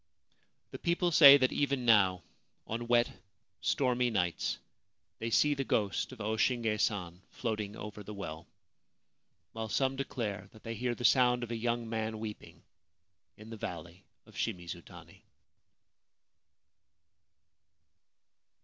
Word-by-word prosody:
The -, -, -7 dB
people 175 Hz, 0 st, +1 dB
say 140 Hz, -3 st, +10 dB
that 130 Hz, -2 st, +2 dB
even 140 Hz, -3 st, 0 dB
now, 95 Hz, -6 st, +4 dB, 0.4 s
on 115 Hz, +2 st, -4 dB
wet, 120 Hz, 0 st, +4 dB, 0.5 s
stormy 125 Hz, -2 st, +1 dB
nights, 90 Hz, -6 st, -1 dB, 0.6 s
they 115 Hz, -, -3 dB
see 150 Hz, +6 st, +4 dB
the 135 Hz, -1 st, -2 dB
ghost 105 Hz, -4 st, 0 dB
of 130 Hz, -, -11 dB
O 110 Hz, +1 st, -2 dB
Shinge 115 Hz, -3 st, +1 dB
San 90 Hz, -5 st, -1 dB
floating 110 Hz, -3 st, -3 dB
over 105 Hz, 0 st, -8 dB
the 105 Hz, +1 st, -8 dB
well, 80 Hz, -4 st, -7 dB, 1.0 s
while 110 Hz, -1 st, -5 dB
some 135 Hz, +4 st, +1 dB
declare 110 Hz, -7 st, -4 dB
that 110 Hz, -, -16 dB
they 115 Hz, -, -4 dB
hear 120 Hz, +2 st, -2 dB
the 120 Hz, -, -4 dB
sound 125 Hz, -2 st, +4 dB
of 120 Hz, -, -6 dB
a -, -, -1 dB
young 120 Hz, 0 st, -1 dB
man 110 Hz, -1 st, -3 dB
weeping 110 Hz, -1 st, -8 dB, 0.7 s
in 110 Hz, +2 st, -12 dB
the 115 Hz, -, -7 dB
Valley 85 Hz, 0 st, -7 dB, 0.2 s
of -, -, -18 dB
Shimizutani. 85 Hz, -1 st, -6 dB
115 Hz, 130 wpm, -32 LUFS, 105-125 Hz, 1.0 s, say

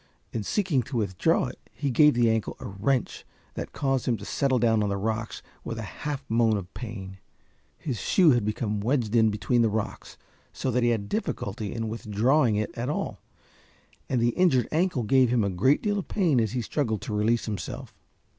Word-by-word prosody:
In 115 Hz, -, -1 dB
seeking 170 Hz, -, +1 dB
to 130 Hz, -, -2 dB
withdraw 105 Hz, -, +1 dB
it 125 Hz, -, -7 dB
he 140 Hz, -3 st, -2 dB
gave 150 Hz, +3 st, +5 dB
the 120 Hz, -1 st, +3 dB
ankle 110 Hz, -1 st, 0 dB
a -, -, -8 dB
wrench 110 Hz, +5 st, -1 dB, 0.3 s
that -, -, -6 dB
caused 135 Hz, -3 st, -1 dB
him 120 Hz, -2 st, +2 dB
to -, -, -9 dB
settle 135 Hz, -2 st, +1 dB
down 115 Hz, -2 st, +3 dB
on 105 Hz, -, 0 dB
the 100 Hz, -, -1 dB
rocks 110 Hz, +2 st, -3 dB, 0.2 s
with 115 Hz, -, -5 dB
a 115 Hz, -, -4 dB
half 140 Hz, +6 st, -5 dB
moan 115 Hz, -1 st, +3 dB
of 95 Hz, -2 st, -7 dB
pain. 95 Hz, -5 st, -7 dB, 0.6 s
His 130 Hz, -8 st, -4 dB
shoe 175 Hz, -5 st, +4 dB
had 120 Hz, -4 st, +2 dB
become 105 Hz, 0 st, -2 dB
wedged 120 Hz, 0 st, 0 dB
in 110 Hz, -1 st, +5 dB
between 105 Hz, +3 st, +1 dB
the 115 Hz, -, +3 dB
rocks 110 Hz, 0 st, -4 dB, 0.3 s
so 130 Hz, -, -2 dB
that 125 Hz, +1 st, +1 dB
he 120 Hz, -, +3 dB
had 110 Hz, -4 st, -1 dB
difficulty 105 Hz, -, -3 dB
in 115 Hz, -1 st, -3 dB
withdrawing 115 Hz, +3 st, +1 dB
it 105 Hz, +1 st, -2 dB
at 120 Hz, +3 st, -3 dB
all, 150 Hz, -, -3 dB, 0.9 s
and 130 Hz, -, +1 dB
the 120 Hz, +1 st, +3 dB
injured 130 Hz, -, +2 dB
ankle 165 Hz, -5 st, +1 dB
gave 130 Hz, +3 st, +4 dB
him 120 Hz, -2 st, +2 dB
a 100 Hz, -, 0 dB
great 130 Hz, +11 st, +2 dB
deal 205 Hz, -1 st, +1 dB
of 190 Hz, -, -6 dB
pain 170 Hz, -, +2 dB
as 110 Hz, -1 st, -1 dB
he 125 Hz, -2 st, -1 dB
struggled 110 Hz, -6 st, -1 dB
to 110 Hz, -, -4 dB
release 110 Hz, +3 st, +1 dB
himself. 105 Hz, -3 st, -5 dB
115 Hz, 200 wpm, -26 LUFS, 105-135 Hz, 0.9 s, gave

